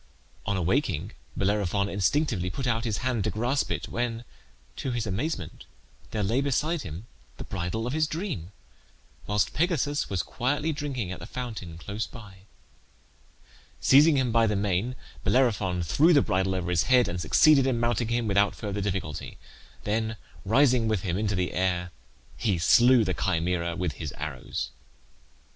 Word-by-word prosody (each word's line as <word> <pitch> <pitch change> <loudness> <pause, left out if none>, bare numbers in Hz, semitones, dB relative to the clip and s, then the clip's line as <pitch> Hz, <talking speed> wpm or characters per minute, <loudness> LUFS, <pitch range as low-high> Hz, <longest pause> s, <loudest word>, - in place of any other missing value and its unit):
On 100 - +1
awaking 95 - 0 0.3
Bellerophon 100 0 +1
instinctively 100 - 0
put 130 +9 -4
out 115 -1 0
his 110 -3 -1
hand 120 -5 0
to - - +1
grasp 125 +6 0
it, - - -3
when, 120 -1 -2 0.5
to - - -3
his 120 -2 -2
amazement, 100 - -3 0.4
there 105 -2 -2
lay 115 +8 +1
beside 145 +4 0
him 85 +4 -7 0.3
the - - -6
bridle 95 +4 -3
of 125 - -2
his 155 0 +2
dream, 155 - -4 0.8
whilst 105 0 +1
Pegasus 150 -3 0
was 95 -4 -1
quietly 145 +5 -1
drinking 135 -10 -3
at 95 - -6
the - - -8
fountain 110 -10 -6
close 100 +6 -4
by. 105 -5 -12 1.4
Seizing 145 +2 +6
him 130 -3 +1
by 115 0 +4
the 105 - +1
mane 100 +5 0 0.3
Bellerophon 105 -9 +2
threw 155 - +4
the 145 - +5
bridle 95 0 0
over 90 -1 -2
his 85 -2 +2
head, 125 -1 +5
and 85 +1 -3
succeeded 135 - +5
in 125 -3 +1
mounting 120 -1 +1
him 120 0 0
without 100 0 +2
further 105 -1 -4
difficulty; 95 -6 -4 0.5
then 110 +1 -1 0.3
rising 125 +1 +4
with 110 -4 0
him 85 -3 -1
into 105 0 0
the 90 0 -1
air 90 -1 0 0.5
he 100 -6 +1
slew 120 +8 +5
the - - -1
Chimaera 85 -2 0
with 90 -2 -1
his 70 - -6
arrows. 75 -3 -5
110 Hz, 160 wpm, -27 LUFS, 95-125 Hz, 1.4 s, Seizing